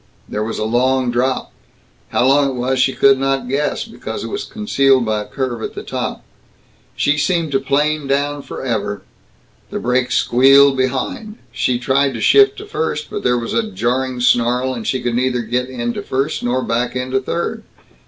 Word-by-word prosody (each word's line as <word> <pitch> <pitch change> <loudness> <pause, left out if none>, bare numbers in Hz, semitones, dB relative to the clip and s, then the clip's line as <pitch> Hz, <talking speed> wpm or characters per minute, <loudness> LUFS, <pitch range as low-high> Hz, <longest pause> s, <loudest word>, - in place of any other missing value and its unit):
There 105 - -3
was 110 +1 -4
a - - -2
long 125 +3 +1
drop. 130 +2 -1 0.6
How - - +1
long 140 +1 +4
it 130 - -4
was 130 +1 -1
she 135 +1 +2
did 135 -1 +4
not 135 -1 0
guess, 140 +3 -1
because 225 - -7
it - - -6
was 405 - -3
concealed 135 - +2
by 110 -1 0
a - - -7
curve 125 -4 -3
at - - -5
the - - -6
top. - - -4 0.7
She 150 +1 +1
seemed 165 -1 0
to 135 - +2
plane 145 +2 0
down 145 +1 0
forever. 115 -7 -4 0.7
The - - -4
brakes 125 +1 0
squealed 135 +2 +5
behind. 135 - -2
She 125 0 0
tried 135 +1 +1
to - - -4
shift 405 - +5
to 420 - -8
first 160 - -3
but - - -4
there 125 0 +2
was 115 -1 -4
a 220 -2 0
jarring 130 - -1
snarl, 125 +1 +2
and 115 -3 -6
she 130 - 0
could 120 -1 -1
neither 125 0 0
get 125 +3 -2
into 120 -2 -3
first 135 +2 -2
nor 125 +1 0
back 120 +2 -1
into 130 +1 -1
third. 170 - -3
130 Hz, 185 wpm, -18 LUFS, 125-140 Hz, 0.7 s, squealed